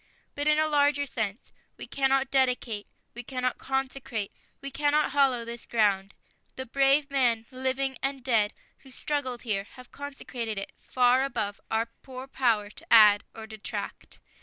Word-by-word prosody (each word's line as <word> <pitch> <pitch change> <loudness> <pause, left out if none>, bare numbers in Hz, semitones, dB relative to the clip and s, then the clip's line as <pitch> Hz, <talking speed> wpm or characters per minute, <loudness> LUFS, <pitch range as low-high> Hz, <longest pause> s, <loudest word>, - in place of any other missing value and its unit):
But, 290 +1 -2
in 300 0 +5
a 310 - +3
larger 285 -1 +3
sense, 220 -4 -4 0.3
we - - -6
cannot 270 -1 +1
dedicate.. 250 -5 +1 0.3
.we 245 - -6
cannot 255 0 -2
consecrate... 265 -6 -3 0.3
we 275 0 -6
cannot 290 +2 +2
hallow 265 -5 +2
this 235 0 -7
ground. 200 -3 +1 0.4
The 260 - -4
brave 275 +3 +3
men, 240 -5 +2
living 260 0 -1
and 270 -1 -2
dead, 220 -5 +2 0.2
who 270 - -16
struggled 260 -2 -3
here 200 -5 -1
have 255 -1 -13
consecrated 255 -6 -5
it, 195 - -5
far 250 +1 +3
above 215 -7 -2
our 225 +1 +1
poor 255 +2 -10
power 230 -6 +1
to - - -12
add 210 -2 +8
or 220 - -7
detract. 220 -1 -7
255 Hz, 155 wpm, -28 LUFS, 225-275 Hz, 0.4 s, add